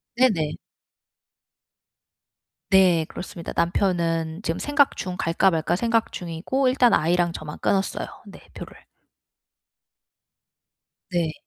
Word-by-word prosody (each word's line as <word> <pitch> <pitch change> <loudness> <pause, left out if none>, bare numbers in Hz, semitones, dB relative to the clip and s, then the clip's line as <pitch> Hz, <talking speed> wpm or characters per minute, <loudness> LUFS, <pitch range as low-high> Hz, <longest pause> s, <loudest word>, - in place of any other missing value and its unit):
네네. 185 -12 +2 2.2
네. 180 -4 +4
그렇습니다. 170 -2 -8
남편은 170 -1 0
지금 165 - -2
생각 290 -1 +2
중 180 -1 -4
'갈까 180 +3 +2
말까.' 165 +1 0
생각 230 +2 0
중이고 180 +11 -2
일단 255 -2 +4
아이랑 170 +2 +2
저만 155 -2 -8
끊었어요. 195 -1 -1 0.2
네, - - -12
표를. - - -11 2.3
네. 170 -3 0
175 Hz, 210 characters per minute, -24 LUFS, 165-205 Hz, 2.3 s, 네